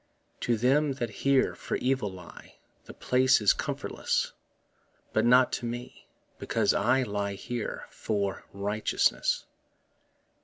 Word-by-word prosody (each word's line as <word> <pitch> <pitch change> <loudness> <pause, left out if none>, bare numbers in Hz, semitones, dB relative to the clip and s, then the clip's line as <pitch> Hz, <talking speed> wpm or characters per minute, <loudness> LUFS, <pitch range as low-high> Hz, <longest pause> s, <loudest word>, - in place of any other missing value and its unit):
To 120 -1 0
them 135 +5 +2
that 120 -4 -4
here 140 -1 +3
for - - -4
evil 125 -6 0
lie 90 -2 -13 0.3
The - - -10
place 130 +1 +3
is 105 -2 +5
comfortless, - - -2 0.8
But 110 - +2
not 125 +1 +6
to 120 - -2
me, 120 +1 -7 0.3
because - - +1
that - - +1
I 130 +1 +3
Lie 100 -3 -2
here 120 +3 -5
for 100 -3 -2
righteousness. 105 +2 0
120 Hz, 125 wpm, -28 LUFS, 105-130 Hz, 0.8 s, not